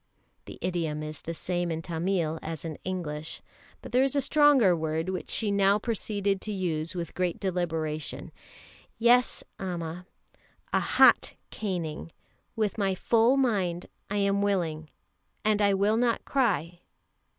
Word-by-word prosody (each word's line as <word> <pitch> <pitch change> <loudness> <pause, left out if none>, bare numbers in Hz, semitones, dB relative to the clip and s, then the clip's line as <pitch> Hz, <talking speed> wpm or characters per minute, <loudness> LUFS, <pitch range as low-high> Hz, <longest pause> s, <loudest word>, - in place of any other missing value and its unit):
(The - - -10
idiom 165 -4 -2
is 155 -1 -6
the 165 - -5
same 175 +1 -2
in 165 0 -3
Tamil 165 -1 -1
as 160 0 -6
in 160 -2 -6
English, 155 -5 -4 0.4
but - - -9
there 250 - +4
is 270 +1 +2
a - - +4
stronger 275 - +5
word 160 +1 -2
which 185 -1 -4
she 215 -3 +2
now 200 0 +4
proceeded 205 -3 -1
to 215 - -4
use 170 -3 -2
with 170 -3 -4
great 180 -2 -1
deliberation.) 160 -5 -2 0.7
"Yes, 240 +2 +3 0.2
Amma, 180 -1 -5 0.7
a - - +4
hot - - +4 0.2
caning 170 -6 -4 0.4
with 220 -1 -1
my 195 -2 +1
full 230 +7 +3
mind 195 -10 0 0.2
I 205 - -1
am 200 0 +2
willing. 165 -6 -1 0.6
And 215 -1 +3
I 200 -1 +4
will 205 +3 +2
not 235 -1 +1
cry. 180 - 0
185 Hz, 145 wpm, -28 LUFS, 165-210 Hz, 0.7 s, stronger